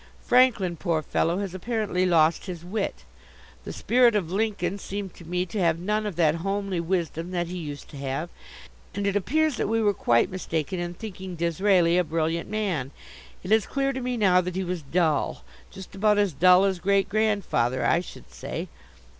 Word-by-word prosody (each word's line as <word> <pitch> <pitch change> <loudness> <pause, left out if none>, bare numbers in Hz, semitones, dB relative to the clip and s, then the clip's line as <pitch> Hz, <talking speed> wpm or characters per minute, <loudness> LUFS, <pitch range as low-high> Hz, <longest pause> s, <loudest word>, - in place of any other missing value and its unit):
Franklin, 235 -9 +3
poor 165 -2 -1
fellow, 170 +4 0
has 195 -2 -4
apparently 195 -2 -1
lost 165 +1 +3
his 175 -2 -7
wit. 200 +3 -3 0.6
The - - -5
spirit 240 -2 +3
of 180 -5 -1
Lincoln 200 -2 -1
seemed 195 -1 -5
to 170 - -14
me 180 +2 -1
to 195 +4 -5
have 165 -3 +2
none 210 +4 -1
of 200 - -5
that 160 -1 +2
homely 195 -1 -2
wisdom 170 -1 -2
that 175 -1 -1
he 180 +2 -6
used 145 -4 -7
to 145 - -10
have. 140 +5 -4 0.6
And 200 0 -2
it 200 0 0
appears 300 - +1
that - - -1
we 225 +1 +1
were 210 -2 +2
quite 115 -10 +2
mistaken 180 -1 -3
in 175 0 -4
thinking 190 -3 -7
Disraeli 170 +1 +2
a - - +3
brilliant 165 +1 -2
man; 190 -11 -2 0.5
it 185 - -6
is 220 -2 +4
clear 275 0 -1
to 260 - -4
me 250 0 -2
now 185 -4 +4
that 180 0 -5
he 190 - -1
was 180 -1 -3
dull 155 +1 0 0.3
just 190 -1 -11
about 210 +1 +2
as 205 -4 +2
dull 180 +6 +5
as 190 -2 0
Great 195 +2 +2
grandfather, 200 - 0
I 170 - +3
should 180 - -11
say. - - -6
185 Hz, 190 wpm, -25 LUFS, 170-205 Hz, 0.6 s, dull